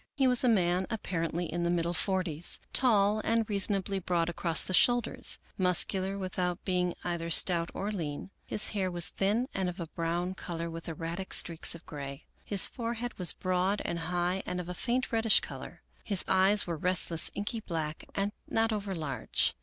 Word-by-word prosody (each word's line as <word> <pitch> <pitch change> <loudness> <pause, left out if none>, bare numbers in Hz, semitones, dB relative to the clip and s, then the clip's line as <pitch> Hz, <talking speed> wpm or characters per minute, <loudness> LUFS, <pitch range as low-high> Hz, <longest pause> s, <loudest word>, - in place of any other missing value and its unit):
He 270 - +2
was 250 -1 +5
a 250 - +4
man 185 -3 +2
apparently 175 -6 -2
in 175 +2 -3
the 170 - 0
middle 170 0 0
forties; 175 -3 -1
tall 210 -4 +4
and 225 -1 +1
reasonably 200 -1 0
broad 170 -2 0
across 165 -3 +1
the 185 - -5
shoulders; 240 +4 +3 0.2
muscular 190 +1 +2
without 185 -1 -3
be 185 -2 +1
ing 180 -1 -1
either 170 -1 -3
stout 170 0 +4
or 205 +2 -3
lean. 165 -2 -5 0.2
His 210 - +4
hair 195 -3 -1
was 175 -1 +1
thin 215 +6 0
and 190 -2 -1
of 180 +2 -8
a 170 - -3
brown 170 +3 -2
color, 170 -2 -5
with 165 +1 -7
erratic 165 +4 -3
streaks 170 0 +1
of 170 - -13
gray. 140 -2 -8 0.2
His 200 -2 +4
forehead 235 -1 -5
was 180 - +6
broad 185 +2 0
and 170 - -2
high 175 +3 -1
and 180 0 -2
of 175 - -6
a 180 - -4
faint 250 +6 -1
reddish 225 -1 +5
color. - - -9 0.2
His 200 -4 +1
eyes 195 +2 +4
were 170 -2 -3
rest 180 +2 +1
less 165 -1 +4
inky 205 +3 -3
black, 160 -6 -4
and 200 +1 0 0.2
not 225 0 +1
over 200 -2 -3
large. 140 -8 -1
180 Hz, 185 wpm, -30 LUFS, 170-205 Hz, 0.2 s, was